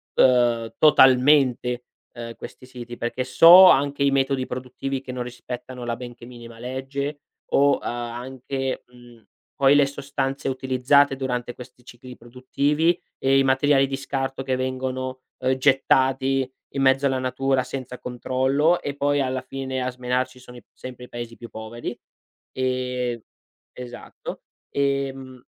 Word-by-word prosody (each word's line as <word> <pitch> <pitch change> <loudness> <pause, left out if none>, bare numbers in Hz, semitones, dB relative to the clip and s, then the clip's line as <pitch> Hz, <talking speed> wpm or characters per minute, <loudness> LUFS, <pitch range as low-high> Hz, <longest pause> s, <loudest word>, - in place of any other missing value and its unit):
ehm, 120 -3 +3
totalmente, 130 -3 +4 0.3
ehm, 115 -1 -8
questi - - -11
siti, 120 -2 -9
perché 120 +2 -3
so 170 +8 +9
anche 140 +1 +2
i 140 - +3
metodi 135 -1 +1
produttivi 130 +2 -5
che 130 -1 -8
non 125 -1 -3
rispettano 125 0 -8
la 120 - -2
benché 120 -1 -10
minima 120 -2 -12
legge 135 +4 -5 0.3
o, 140 0 +4
uhm, - - -1
anche, 125 +3 -4
mhmm, 120 -2 -18 0.3
poi 135 0 +4
le 145 -1 +5
sostanze 140 -1 -4
utilizzate 130 +2 +2
durante 125 -2 -3
questi 125 0 -13
cicli 125 +1 -12
produttivi, 140 +8 0 0.2
e 135 0 +3
i - - +4
materiali 135 +1 +3
di 135 - -3
scarto 135 -1 -3
che 130 -1 -1
vengono, 130 0 -3 0.2
uhm, 130 0 +1
gettati 135 0 +2 0.3
in 135 - -2
mezzo 135 +1 +4
alla 135 -1 0
natura 130 0 0
senza 130 -1 -7
controllo, 130 +7 0
e 140 -1 -4
poi 145 0 +1
alla 130 -1 -2
fine 130 -1 -5
a 125 - -1
smenarci 125 +1 -2
sono 125 -1 -13
i 120 - -14
sempre 125 -1 -10
i - - -19
Paesi 120 -1 -7
più 120 - -10
poveri. 115 +2 -7 0.6
Ehm 125 -2 -2 0.5
esatto. 125 -1 -9 0.3
Ehm 135 -2 -2
130 Hz, 145 wpm, -23 LUFS, 125-135 Hz, 0.6 s, so